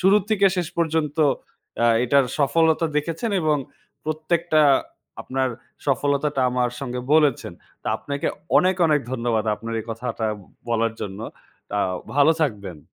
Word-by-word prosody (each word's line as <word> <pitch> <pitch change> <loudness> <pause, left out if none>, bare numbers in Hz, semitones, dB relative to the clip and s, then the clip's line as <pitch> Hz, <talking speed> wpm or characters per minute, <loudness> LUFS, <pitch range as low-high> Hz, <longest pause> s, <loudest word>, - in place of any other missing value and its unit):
শুরু 190 +2 +5
থেকে 200 -2 +4
শেষ 175 -2 -1
পর্যন্ত 160 -2 0 0.7
আ - - +5 0.2
এটার 135 +1 +4
সফলতা 160 +3 +3
দেখেছেন 165 +9 -1
এবং 155 -1 +3 0.5
প্রত্যেকটা 155 +1 +1 0.6
আপনার 130 0 -1 0.4
সফলতাটা 140 +1 +1
আমার 125 -1 +1
সঙ্গে 125 -2 -4
বলেছেন। 145 - +2 0.3
তো, - - -12
আপনাকে 140 0 -4 0.3
অনেক, 185 +1 +3
অনেক 150 -2 +3
ধন্যবাদ, 115 -3 0
আপনার 115 +2 -7
এই - - -9
কথাটা 115 -1 -3 0.4
বলার 115 -1 +1
জন্য। 100 +1 -5 0.5
তাও 100 -2 0 0.2
ভালো 145 +3 +6
থাকবেন। 100 - -3
140 Hz, 130 wpm, -23 LUFS, 120-160 Hz, 0.7 s, ভালো